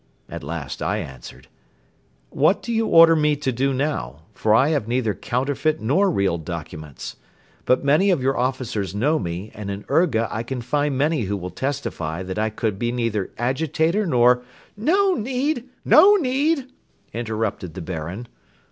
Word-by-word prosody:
At - - -8
last 70 -2 -5
I - - 0
answered: 65 -3 -9 0.8
"What - - +2
do 235 - -3
you 225 0 +1
order 165 0 +7
me 150 -1 +2
to 140 -2 -2
do 135 +3 0
now, 130 - -3
for 110 0 +2
I 135 +6 +4
have 145 -9 0
neither 120 -3 0
counterfeit 140 +7 -1
nor 170 - +2
real 100 - 0
documents? 75 -3 -7 0.5
But 130 - +2
many 155 +8 +4
of 180 -5 +3
your 135 +1 0
officers 120 -6 -2
know 145 +9 +2
me 90 +4 -5
and 105 -2 -7
in 100 +1 -5
Urga 125 -10 +2
I 110 - -2
can 125 +1 -5
find 145 +2 0
many 145 -3 +1
who 100 +1 -2
will 90 -1 -6
testify 95 - -3
that 95 +2 -4
I 110 0 +1
could 110 -2 -3
be 120 0 0
neither 115 -5 -1
agitator 160 - 0
nor.. 125 -3 +4 0.2
." - - -31
"No 375 - +2
need, 260 +1 -2 0.2
no 390 +7 +7
need!" 280 -3 0 0.4
interrupted 110 -7 -3
the 95 - -5
Baron. 90 +7 -5
125 Hz, 165 wpm, -22 LUFS, 100-160 Hz, 0.8 s, order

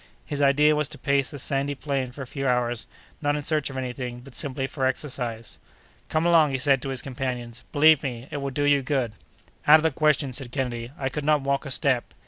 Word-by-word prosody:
His 145 -2 -3
idea 145 +2 +5
was 150 -1 0
to - - -10
pace 140 -2 +1
the 145 - -8
sandy 140 +1 -1
plain 135 -3 -2
for 140 +2 -7
a - - -7
few 135 +2 -3
hours, 120 -2 0 0.3
not 145 -1 +1
in 150 - -3
search 150 -1 0
of 135 - -7
any 130 -2 -3
thing, 125 -1 -6
but 135 +1 -14
simply 135 0 -3
for 135 -1 -1
exercise. 125 -4 -3 0.5
"Come 160 +1 +1
along!" 165 -3 +5
he 135 - -1
said 135 -1 +2
to 135 - -4
his 130 -2 -2
companions; 125 -3 -4
"believe 155 0 +6
me, 125 -2 -5
it - - -3
will 140 -1 -3
do 145 +2 -2
you 145 -1 +4
good." 130 -4 -1 0.5
"Out 150 +1 +10
of 155 - -3
the 160 - +3
question!" 145 -2 +2
said 125 -1 -1
Kennedy; 120 -3 -3
"I 135 -1 -1
could 150 +2 -4
not 150 0 +3
walk 140 +1 -1
a - - -5
step." 130 -1 +1
135 Hz, 235 wpm, -25 LUFS, 125-145 Hz, 0.5 s, Out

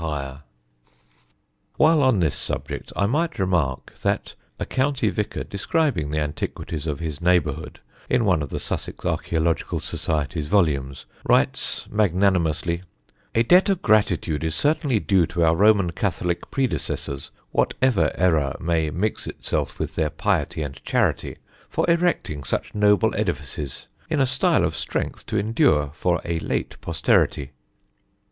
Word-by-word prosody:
[Sidenote: 80 -2 -2
CLOSED 70 -1 -6
CHURCHES] - - -34
While 155 0 +5
on 130 -7 +4
this 80 -4 +2
subject - - -4
I 100 - +2
might 160 +9 0
remark 85 -9 0
that - - -1 0.3
a - - -2
county 130 -4 +1
vicar 105 +1 -3
describing 100 - 0
the 75 - -2
antiquities 75 +1 -4
of 75 -1 -2
his 80 -3 -4
neighbourhood 80 -4 +1 0.3
in 125 -2 +2
one 90 -6 +3
of 70 - -4
the - - -4
Sussex - - -4
Archæological 80 0 0
Society's 75 0 -2
volumes, 75 -8 +1 0.2
writes - - +1
magnanimously: 90 -4 +1 0.5
"A 115 - +4
debt 180 - +5
of 195 -3 0
gratitude 100 -7 +2
is 80 -1 -1
certainly 145 - +1
due 95 -5 +2
to 85 -1 0
our 80 0 +4
Roman 100 -2 +4
Catholic 85 -1 -2
predecessors 85 - -2 0.2
(whatever 130 -5 +2
error 80 -6 +2
might 80 -3 0
mix 105 +5 -2
itself - - -3
with - - -3
their - - 0
piety 80 - -1
and 70 -2 -8
charity) - - 0 0.3
for - - 0
erecting 170 - +1
such 65 - -3
noble 105 +1 +3
edifices, 75 - -3 0.2
in 155 -2 0
a 135 - +4
style 135 +1 +2
of - - -2
strength - - -3
to 110 - -1
endure 80 -9 +2
for 85 +1 0
a 85 -1 -1
late - - -3
posterity." 80 -3 +1
85 Hz, 145 wpm, -23 LUFS, 75-110 Hz, 0.5 s, While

